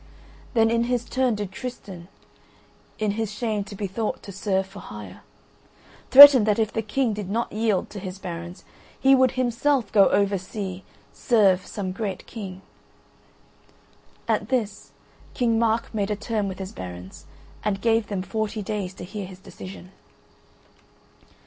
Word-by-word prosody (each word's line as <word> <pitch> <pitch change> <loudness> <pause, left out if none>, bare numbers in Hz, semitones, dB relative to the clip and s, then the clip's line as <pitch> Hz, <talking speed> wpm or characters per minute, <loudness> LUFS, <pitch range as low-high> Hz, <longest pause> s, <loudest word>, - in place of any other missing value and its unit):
Then 225 -1 +4
in 235 0 +2
his 245 -1 -1
turn 255 -2 0
did 205 -2 -5
Tristan 190 -6 -8 0.9
(in 215 -1 0
his 220 0 -3
shame 215 -1 -2
to 200 - -9
be 200 - -4
thought 210 +3 -3
to 200 - -8
serve 195 0 -1
for 195 +1 -12
hire) 105 -3 -10 0.9
threaten 275 -2 +11
that 210 -1 +2
if 220 -2 0
the 225 - 0
King 225 +2 0
did 205 -2 -5
not 230 +4 -2
yield 215 -3 0
to 205 - -7
his 185 0 -7
barons, 175 -1 -7 0.4
he 270 0 +5
would 260 -1 +4
himself 255 -1 0
go 200 -3 +6
over 200 -1 +2
sea 190 -1 -6 0.3
serve 195 -6 +2
some 195 -3 -4
great 195 -1 -4
king. 190 -4 -8 1.6
At - - 0
this, 220 -6 -2 0.5
King 230 -2 +1
Mark 230 0 0
made 205 -2 -1
a 210 - 0
term 215 -1 -2
with 190 -1 -5
his 190 0 -6
barons 90 0 -9 0.4
and 205 -2 -1
gave 225 -1 +1
them 195 -3 -3
forty 215 +1 -3
days 195 -2 -4
to - - -9
hear 195 +1 -6
his 185 -1 -11
decision. 185 0 -11
210 Hz, 155 wpm, -24 LUFS, 190-230 Hz, 1.6 s, threaten